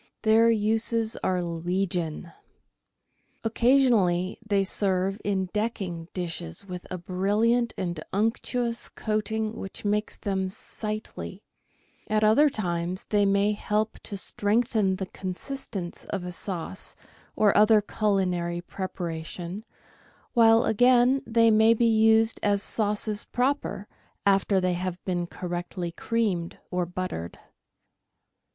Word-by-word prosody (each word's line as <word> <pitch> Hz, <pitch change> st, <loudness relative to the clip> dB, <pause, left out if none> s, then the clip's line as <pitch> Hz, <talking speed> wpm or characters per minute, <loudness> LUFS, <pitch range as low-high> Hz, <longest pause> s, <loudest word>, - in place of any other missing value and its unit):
Their 225 Hz, +1 st, +5 dB
uses 225 Hz, +1 st, +1 dB
are 180 Hz, -1 st, 0 dB
legion. 170 Hz, -1 st, -2 dB, 1.1 s
Occasionally 225 Hz, -7 st, +3 dB
they 200 Hz, -2 st, +1 dB
serve 195 Hz, 0 st, 0 dB
in 190 Hz, -2 st, -1 dB
decking 195 Hz, -6 st, -3 dB
dishes 170 Hz, -, -4 dB
with 180 Hz, -2 st, -7 dB
a 185 Hz, -, -4 dB
brilliant 210 Hz, +7 st, +1 dB
and 175 Hz, -4 st, -3 dB
unctuous 230 Hz, +3 st, -1 dB
coating 215 Hz, 0 st, -2 dB
which 195 Hz, 0 st, -8 dB
makes 210 Hz, +1 st, 0 dB
them 190 Hz, -2 st, -2 dB
sightly; 215 Hz, +2 st, -5 dB, 0.6 s
at 215 Hz, 0 st, +1 dB
other 230 Hz, +8 st, +5 dB
times 180 Hz, -5 st, -2 dB
they 205 Hz, -1 st, +3 dB
may 200 Hz, +1 st, +3 dB
help 210 Hz, +1 st, -1 dB
to 200 Hz, -, -6 dB
strengthen 210 Hz, 0 st, +1 dB
the 190 Hz, 0 st, -4 dB
consistence 185 Hz, 0 st, -6 dB
of 195 Hz, -3 st, -4 dB
a 180 Hz, -, -4 dB
sauce 180 Hz, 0 st, -4 dB, 0.4 s
or 210 Hz, -2 st, +3 dB
other 215 Hz, +1 st, +6 dB
culinary 185 Hz, -5 st, 0 dB
preparation, 175 Hz, +1 st, -5 dB, 0.7 s
while 230 Hz, 0 st, +6 dB
again 245 Hz, +3 st, +4 dB
they 230 Hz, 0 st, +4 dB
may 220 Hz, +1 st, +5 dB
be 235 Hz, -, +2 dB
used 225 Hz, 0 st, +4 dB
as 205 Hz, 0 st, +1 dB
sauces 210 Hz, -1 st, 0 dB
proper 245 Hz, -6 st, -1 dB, 0.4 s
after 195 Hz, 0 st, +3 dB
they 185 Hz, -1 st, +1 dB
have 180 Hz, 0 st, -3 dB
been 175 Hz, -2 st, -1 dB
correctly 175 Hz, 0 st, -4 dB
creamed 190 Hz, -4 st, -1 dB
or 180 Hz, -1 st, -1 dB
buttered. 180 Hz, -, -5 dB
200 Hz, 115 wpm, -26 LUFS, 180-220 Hz, 1.1 s, other